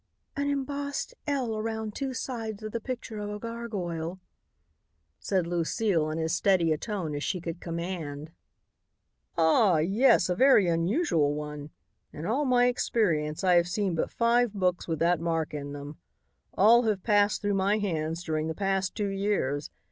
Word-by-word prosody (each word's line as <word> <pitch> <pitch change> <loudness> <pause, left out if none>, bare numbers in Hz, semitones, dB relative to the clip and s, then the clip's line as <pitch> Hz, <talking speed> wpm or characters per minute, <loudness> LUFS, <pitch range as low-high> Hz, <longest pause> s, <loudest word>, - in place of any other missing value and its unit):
"An 285 -1 -1
embossed 285 - -3
'L' 260 -6 -1
around 220 0 -3
two 270 +3 -3
sides 225 -5 -5
of 215 - -5
the 230 - -2
picture 235 -2 -6
of 205 0 -4
a 210 - -4
gargoyle," 190 -7 -5 1.0
said 185 -4 0
Lucile 170 0 0
in 155 - -3
as 160 -1 -1
steady 175 -3 +3
a - - -2
tone 190 -9 -3
as 145 0 -3
she 185 - -1
could 170 0 -6
command. 165 -3 -5 1.1
"Ah! 170 +3 +4
yes, 195 +7 +4
a 180 - +1
very 255 0 +5
unusual 165 - +1
one. 150 -1 -6 0.4
In 155 - -7
all 265 +9 0
my 250 -2 +4
experience 170 -11 0
I 185 -1 +4
have 170 0 +3
seen 190 +1 -1
but 160 - -1
five 235 -1 +2
books 180 -2 0
with 165 -2 -1
that 170 +2 +2
mark 165 -2 -1
in 145 -1 -5
them. 145 +1 -8 0.6
All 225 +5 +6
have 205 -4 0
passed 205 -1 +2
through 205 0 +1
my 195 +2 +2
hands 165 -4 -2
during 155 -2 -1
the 160 - -3
past 195 -2 -1
two 205 -1 -1
years. 195 -8 -1
190 Hz, 165 wpm, -28 LUFS, 165-220 Hz, 1.1 s, All